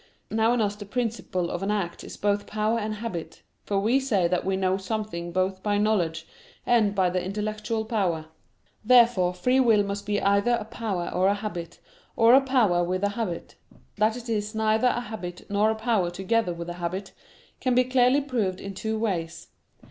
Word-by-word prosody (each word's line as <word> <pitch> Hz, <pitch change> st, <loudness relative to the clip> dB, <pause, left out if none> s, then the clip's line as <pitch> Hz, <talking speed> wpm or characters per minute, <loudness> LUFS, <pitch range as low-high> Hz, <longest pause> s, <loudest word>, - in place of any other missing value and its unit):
Now 225 Hz, +1 st, +3 dB
in 245 Hz, -, +1 dB
us 205 Hz, -1 st, 0 dB
the 205 Hz, 0 st, -9 dB
principle 220 Hz, -6 st, -2 dB
of 175 Hz, -, -3 dB
an 195 Hz, -, -2 dB
act 195 Hz, -5 st, -2 dB
is -, -, -9 dB
both 205 Hz, 0 st, 0 dB
power 215 Hz, +2 st, 0 dB
and 215 Hz, 0 st, -3 dB
habit; 210 Hz, -7 st, -6 dB, 0.2 s
for 200 Hz, -1 st, 0 dB
we 230 Hz, +7 st, +3 dB
say 210 Hz, -10 st, +1 dB
that 180 Hz, 0 st, 0 dB
we 190 Hz, 0 st, 0 dB
know 190 Hz, -1 st, +1 dB
something 190 Hz, -3 st, -4 dB
both 185 Hz, +1 st, -1 dB
by 205 Hz, 0 st, 0 dB
knowledge 175 Hz, -6 st, 0 dB, 0.4 s
and 215 Hz, -4 st, +3 dB
by 185 Hz, -2 st, +2 dB
the 180 Hz, 0 st, -1 dB
intellectual 215 Hz, +3 st, -3 dB
power. 185 Hz, -8 st, -1 dB, 0.6 s
Therefore 230 Hz, -6 st, +5 dB
free 250 Hz, +8 st, +2 dB
will 225 Hz, -5 st, +4 dB
must 200 Hz, 0 st, -5 dB
be 205 Hz, 0 st, +1 dB
either 200 Hz, +4 st, +2 dB
a 215 Hz, -, -6 dB
power 215 Hz, -6 st, -3 dB
or 185 Hz, +1 st, +2 dB
a 200 Hz, -, +3 dB
habit, 200 Hz, -5 st, -6 dB, 0.4 s
or 230 Hz, +1 st, +6 dB
a 270 Hz, -, +8 dB
power 235 Hz, -10 st, +2 dB
with 185 Hz, +2 st, -2 dB
a 205 Hz, -, +3 dB
habit. 205 Hz, -5 st, -4 dB, 0.4 s
That 215 Hz, +2 st, +2 dB
it 245 Hz, 0 st, -9 dB
is 215 Hz, -1 st, -2 dB
neither 220 Hz, +2 st, +2 dB
a 245 Hz, -, +1 dB
habit 205 Hz, -7 st, -7 dB
nor 205 Hz, +2 st, +3 dB
a 220 Hz, -, 0 dB
power 220 Hz, -5 st, +1 dB
together 190 Hz, +3 st, 0 dB
with 170 Hz, 0 st, -6 dB
a -, -, -4 dB
habit, 185 Hz, +3 st, -4 dB, 0.5 s
can 255 Hz, -2 st, +1 dB
be 250 Hz, -, +5 dB
clearly 255 Hz, +2 st, +3 dB
proved 225 Hz, -9 st, -2 dB
in 195 Hz, -, -6 dB
two 220 Hz, +3 st, -3 dB
ways. 175 Hz, -7 st, -3 dB
210 Hz, 195 wpm, -26 LUFS, 185-225 Hz, 0.6 s, a